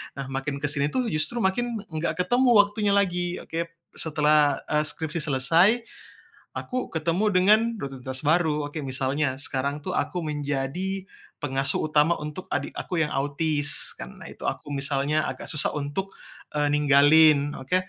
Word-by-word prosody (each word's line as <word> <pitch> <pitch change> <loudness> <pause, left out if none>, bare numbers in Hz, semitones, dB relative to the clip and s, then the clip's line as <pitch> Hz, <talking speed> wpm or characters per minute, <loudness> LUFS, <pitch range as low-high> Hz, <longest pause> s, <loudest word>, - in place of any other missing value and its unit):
Nah 135 0 -5
makin 135 +1 -3
ke 145 - +2
sini 140 -1 +1
tuh 250 +3 -1
justru 155 +10 -1
makin 235 +5 0 0.2
nggak 170 +3 -1
ketemu 245 +6 +3
waktunya 205 0 +3
lagi, 180 -3 +1
oke. 170 +1 -3 0.3
Setelah 150 -2 +2
e 150 - 0
skripsi 160 +1 -4
selesai, 165 - +3 0.7
aku 255 0 -3
ketemu 165 +5 0
dengan 200 +4 +6 0.2
rutinitas 130 -3 -5
baru, 155 -1 +2
oke, 155 - -5
misalnya 135 +1 -1
sekarang 140 +1 -3
tuh 185 - -3
aku 180 -2 -1
menjadi 150 +6 -3 0.4
pengasuh 135 -1 0
utama 155 +2 +3
untuk 150 +5 -7
adik - - -2
aku 170 -3 -1
yang 150 - -3
autis, 145 +1 -1
karena 60 - -9
itu - - -6
aku 145 - -4
misalnya 140 +2 0
agak - - -6
susah 150 - +1
untuk, 150 +7 -4 0.4
eee, 145 0 +2
ninggalin, 145 +1 +5
oke. 130 +7 -1
150 Hz, 150 wpm, -25 LUFS, 140-180 Hz, 0.7 s, dengan